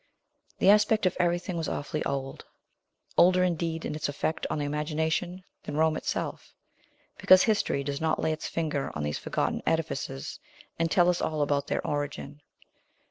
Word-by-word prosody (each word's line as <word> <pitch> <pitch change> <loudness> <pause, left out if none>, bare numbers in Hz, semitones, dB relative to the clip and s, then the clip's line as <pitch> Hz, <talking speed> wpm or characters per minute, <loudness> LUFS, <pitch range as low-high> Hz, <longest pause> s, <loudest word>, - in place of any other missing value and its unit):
The 195 - +6
aspect 210 0 +4
of 185 - +2
everything 175 0 0
was 165 - -2
awfully 150 +1 -3
old; 135 -1 -4 0.7
older, 180 +1 +6
indeed, 165 -2 -1
in - - -3
its 150 -1 -2
effect 150 +2 -2
on - - -1
the 145 - -1
imagination 160 +5 -1 0.2
than 145 - -5
Rome 160 0 +3
itself, - - -4 0.6
because 185 0 +7
history 205 -10 +1
does 140 +1 -3
not 160 -1 +1
lay 160 - +1
its 155 - -5
finger 155 -4 -2
on 75 - -3
these 75 0 -2
forgotten - - -1
edifices 65 - -2 0.4
and 165 0 +1
tell 175 +1 +4
us 180 -1 +2
all 155 -2 0
about 145 -1 0
their - - -2
origin. 145 0 -4
160 Hz, 165 wpm, -28 LUFS, 145-175 Hz, 0.7 s, because